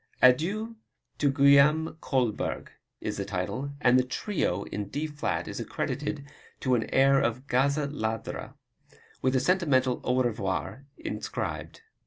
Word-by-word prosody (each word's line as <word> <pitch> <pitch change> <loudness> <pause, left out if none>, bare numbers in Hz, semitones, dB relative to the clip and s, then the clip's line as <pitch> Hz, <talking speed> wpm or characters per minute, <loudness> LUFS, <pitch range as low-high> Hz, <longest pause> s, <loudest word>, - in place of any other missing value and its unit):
Adieu 195 - +3 0.4
to 145 - +3
Guillaume 140 +3 +5
Kolberg, 125 -6 -1 0.3
is - - -3
the 100 - -1
title, 100 +9 -3
and 125 -2 +5
the - - +3
Trio 125 - -1
in 105 -1 -5
D 145 +6 -2
flat 150 -1 -2
is - - -5
accredited 145 -1 -3 0.4
to 130 - +1
an 115 -3 +1
air 135 +1 +5
of 120 +3 -1
"Gazza 140 +3 +2
Ladra," 110 -6 -4 0.7
with 130 0 +1
a - - +4
sentimental 130 -6 +2
Au 130 +1 +2
Revoir 120 +4 -3
inscribed. - - -5
135 Hz, 135 wpm, -28 LUFS, 125-150 Hz, 0.7 s, Guillaume